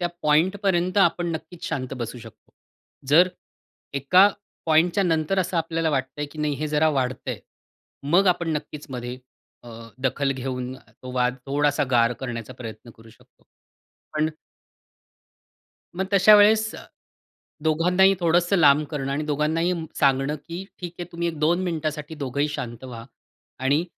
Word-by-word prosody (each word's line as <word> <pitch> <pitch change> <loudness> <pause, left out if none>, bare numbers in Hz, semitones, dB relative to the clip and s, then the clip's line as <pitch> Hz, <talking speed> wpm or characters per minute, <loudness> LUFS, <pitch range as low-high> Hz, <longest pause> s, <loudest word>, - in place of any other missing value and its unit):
त्या 175 - 0
पॉइंटपर्यंत 185 +4 +2
आपण 175 -2 +3
नक्कीच 165 +2 -8
शांत 130 0 -3
बसू 120 0 -5
शकतो. 110 -1 -15 0.6
जर 170 +6 +6 0.7
एका 180 +9 +5 0.4
पॉइंटच्या 170 +5 +3
नंतर 165 +2 +1
असं 185 -1 -1
आपल्याला 165 0 0
वाटतंय, 140 +1 -2
की 150 +2 -12
नाही 150 -1 0
हे 155 +3 -3
जरा 155 +1 +2
वाढतंय, 130 -1 -2 0.6
मग 175 +7 +3
आपण 175 -2 +1
नक्कीच 150 0 -9
मध्ये 125 -1 -5 0.5
अ, 120 - -11 0.3
दखल 135 +1 0
घेऊन 130 -1 -4
तो 130 0 -13
वाद 125 0 +1
थोडासा 145 +1 +1
गार 120 0 +4
करण्याचा 120 -2 -5
प्रयत्न 110 0 -9
करू 115 0 -17
शकतो. - - -24 0.7
पण 155 +1 +1 1.7
मग 190 +2 -1
तशा 200 +2 +7
वेळेस 220 +1 +4
अ, - - -9 0.8
दोघांनाही 180 +5 +4
थोडंसं 175 +3 +2
लांब 150 -2 +5
करणं 140 -2 -3
आणि 150 +2 -2
दोघांनाही 155 +4 0 0.3
सांगणं, 135 +2 +2
की 170 +5 -8 0.2
"ठीक 175 -1 -5
आहे 175 - -4
तुम्ही 170 0 -2
एक 160 - -5
दोन 170 +4 +2
मिनिटासाठी 155 -2 -3
दोघंही 145 0 -2
शांत 120 -4 -6
व्हा 115 -3 -8 0.6
आणि 145 +5 +2
150 Hz, 145 wpm, -24 LUFS, 130-175 Hz, 1.7 s, तशा